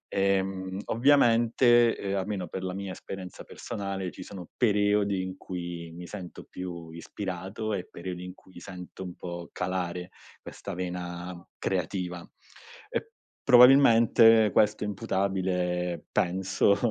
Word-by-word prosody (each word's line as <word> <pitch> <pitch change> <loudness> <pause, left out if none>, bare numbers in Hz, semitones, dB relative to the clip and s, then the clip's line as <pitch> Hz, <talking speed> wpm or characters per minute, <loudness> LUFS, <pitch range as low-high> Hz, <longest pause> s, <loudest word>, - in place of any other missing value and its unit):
Ehm, 95 -1 0
ovviamente, 120 -2 +4
ehm, 100 0 -2
almeno 95 -1 -3
per 95 - -5
la 90 -1 -3
mia 100 -1 -5
esperienza 95 -1 -8
personale, 95 -2 -5
ci - - -11
sono 90 -4 -9
periodi 105 -3 +2
in 95 0 -6
cui 85 -2 -6
mi 90 +1 -9
sento 90 -3 -8
più 85 -3 -7
ispirato, 95 +4 -5
e 95 -3 -3
periodi 90 0 -6
in 90 - -7
cui 90 -2 -15
sento 90 0 -9
un 90 -1 -7
po' 85 -1 -7
calare 90 0 -3 0.3
questa 100 - -8
vena 90 0 -5 0.2
creativa. 90 -1 -2
Uhm - - -15 1.2
probabilmente, 115 -4 +7
questo 105 0 +3
è - - -2
imputabile 90 -3 -1
penso, 95 +2 +2
95 Hz, 125 wpm, -28 LUFS, 90-105 Hz, 1.2 s, probabilmente